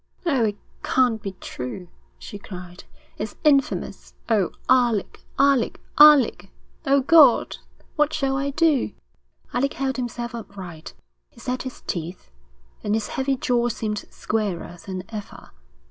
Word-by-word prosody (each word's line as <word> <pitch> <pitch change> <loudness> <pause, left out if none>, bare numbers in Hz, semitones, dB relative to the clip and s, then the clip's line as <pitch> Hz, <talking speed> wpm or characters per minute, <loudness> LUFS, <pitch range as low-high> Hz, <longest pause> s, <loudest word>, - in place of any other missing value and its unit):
'Oh, 270 -9 +2
it 205 -1 -2 0.2
can't 245 -4 +2
be 195 - -5
true,' 175 0 -7 0.3
she 205 - -9
cried. 180 -2 -10 0.3
'It's 210 0 -4
infamous. 280 -3 +1
Oh, 210 -6 +2 0.2
Alec, 240 -5 +2 0.2
Alec, 275 -3 +3 0.2
Alec... 295 -3 +7 0.4
O 275 0 +4
God, 310 +3 +5 0.4
what 300 0 +3
shall 275 -3 0
I 275 +1 -1
do.' 295 -2 +2 0.6
Alec 275 +3 0
held 270 -1 -2
himself 240 -1 -4
upright. 190 -8 -9 0.3
He - - -20
set 250 +2 -3
his 260 - -8
teeth, 170 - -6 0.5
and 210 +1 +1
his 220 -1 -2
heavy 270 0 0
jaw 240 -1 +1
seemed 210 -2 -3
squarer 190 -5 -3
than 185 -1 -4
ever. 210 -2 -9
235 Hz, 130 wpm, -23 LUFS, 200-270 Hz, 0.6 s, Alec